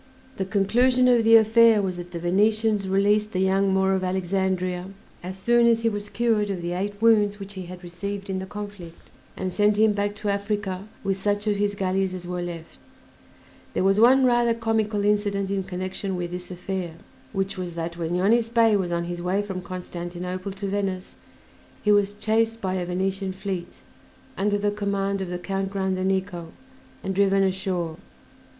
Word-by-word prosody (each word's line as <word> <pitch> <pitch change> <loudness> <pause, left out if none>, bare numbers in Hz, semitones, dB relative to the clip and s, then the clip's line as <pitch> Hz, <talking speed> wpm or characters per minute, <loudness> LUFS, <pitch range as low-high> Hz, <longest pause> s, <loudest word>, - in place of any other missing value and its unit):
The 190 - -1
conclusion 245 +6 +3
of 240 -2 +5
the 225 +1 +7
affair 225 0 +6
was 185 -3 -2
that 175 0 -7
the 175 - -6
Venetians 210 +4 +2
released 205 +2 +2
"The 185 - 0
Young 190 +1 +2
Moor 190 0 +2
of 190 -1 0
Alexandria" 185 -1 -1 0.3
as 185 +2 -6
soon 235 +4 +4
as 230 -1 +3
he 230 - +2
was 205 -1 -5
cured 215 -1 +1
of 185 -3 -3
the 175 - -2
eight 200 +3 -3
wounds 210 -2 +4
which 200 0 -8
he 185 -2 -7
had 180 0 -10
received 195 +3 -5
in 190 -1 -2
the 190 - -6
conflict, 205 -5 -9 0.3
and 185 -1 -2
sent 205 +2 +2
him 215 0 +4
back 205 0 -1
to 210 0 -3
Africa 200 -1 -2 0.2
with 195 -1 -1
such 205 +1 0
of 210 -1 +1
his 205 0 0
galleys 190 -1 0
as 180 -1 -7
were 180 0 -3
left. 170 -2 -7 1.0
There - - +1
was 195 +2 +3
one 260 +3 +6
rather 240 -2 +3
comical 220 -2 0
incident 205 -1 +1
in 195 -1 0
connection 185 +1 -4
with 175 -1 -4
this 180 0 -6
affair, 180 -1 -4 0.4
which 195 -1 -2
was 175 -2 -5
that 170 0 -4
when 170 0 -2
Yonis 225 +5 +3
Bey 230 -2 +4
was 185 -3 -1
on 170 0 0
his 175 0 -5
way 185 +3 0
from 190 -3 -5
Constantinople 180 +1 -5
to 200 +1 -6
Venice 195 -2 -2 0.7
he 210 - +3
was 205 -1 +3
chased 225 +2 0
by 190 -3 -2
a 180 -2 -2
Venetian 190 +1 -2
fleet, 190 -2 -5 0.5
under 205 +1 +1
the 205 0 0
command 200 -1 -1
of 190 - -4
the 180 - -3
Count 195 +2 -3
Grandenico, 190 -2 -1 0.6
and 190 - -2
driven 195 0 +3
ashore. 185 -4 -1
195 Hz, 185 wpm, -25 LUFS, 185-205 Hz, 1.0 s, the